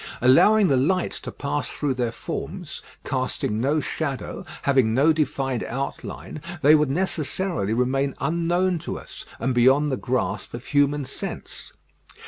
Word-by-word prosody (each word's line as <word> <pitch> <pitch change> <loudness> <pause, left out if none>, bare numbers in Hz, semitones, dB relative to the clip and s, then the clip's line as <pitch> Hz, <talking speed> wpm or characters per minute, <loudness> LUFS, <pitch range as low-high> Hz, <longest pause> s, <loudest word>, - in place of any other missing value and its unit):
Allowing 200 - +6
the 140 -7 +3
light 180 +8 +1
to - - -7
pass 145 +1 -3
through 145 -3 -1
their 120 -2 -1
forms, 115 - -6 0.2
casting 105 +1 -1
no 145 +5 +2
shadow, 150 +3 -4 0.2
having 130 -5 +3
no 150 +5 +5
defined 135 -5 -1
outline, 135 +3 -5 0.2
they 150 +2 +8
would 150 -2 +4
necessarily 160 - -1
remain 135 +3 +1
unknown 170 +4 +1
to - - -5
us, - - -10
and 130 +2 -1
beyond 135 +4 +4
the 130 - 0
grasp 115 -5 -2
of 120 - -8
human 145 0 +2
sense. 130 - -7
140 Hz, 140 wpm, -24 LUFS, 130-155 Hz, 0.2 s, they